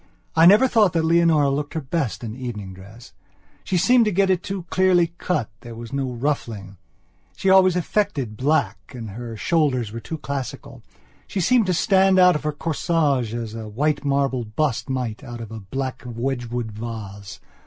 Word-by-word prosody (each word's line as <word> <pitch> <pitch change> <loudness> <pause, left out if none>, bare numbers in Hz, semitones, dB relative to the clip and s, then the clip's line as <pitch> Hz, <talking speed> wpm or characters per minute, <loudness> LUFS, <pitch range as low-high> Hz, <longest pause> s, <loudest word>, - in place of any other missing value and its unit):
I 165 +1 +7
never 210 +8 +7
thought 215 -7 +3
that 165 -1 +1
Leonora 165 -4 +4
looked 145 +3 -3
her - - 0
best 140 -4 -3
in 110 -1 -5
evening 110 -7 -6
dress. 100 +5 -14 0.5
She 185 - -1
seemed 240 +6 +4
to 210 - +1
get 195 +1 +2
it 180 -2 +1
too 195 -1 -5
clearly 180 -3 +3
cut, 145 - -1
there 120 -2 -10
was 115 +1 -9
no 135 -1 -1
ruffling. 115 -7 -3 0.6
She 190 - +1
always 185 -1 +6
affected 175 - -1
black 140 +2 -1
and 115 -4 -7
her 115 +1 -7
shoulders 130 - +1
were 115 - -6
too 160 +7 -6
classical. 140 -4 -6 0.5
She 195 - -3
seemed 225 +3 +3
to 185 - +2
stand 190 0 +4
out 180 -1 +7
of 150 - -2
her 150 - -1
corsage 145 -6 0
as 115 -2 -5
a 110 -1 -6
white 145 +6 0
marble 140 -3 0
bust 125 +4 -2
might 125 -2 -3
out 120 -3 -8
of 115 -2 -8
a 110 - -6
black 130 +6 -5
Wedgwood 120 -1 -3
vase. 105 -3 -7
135 Hz, 180 wpm, -22 LUFS, 115-170 Hz, 0.6 s, I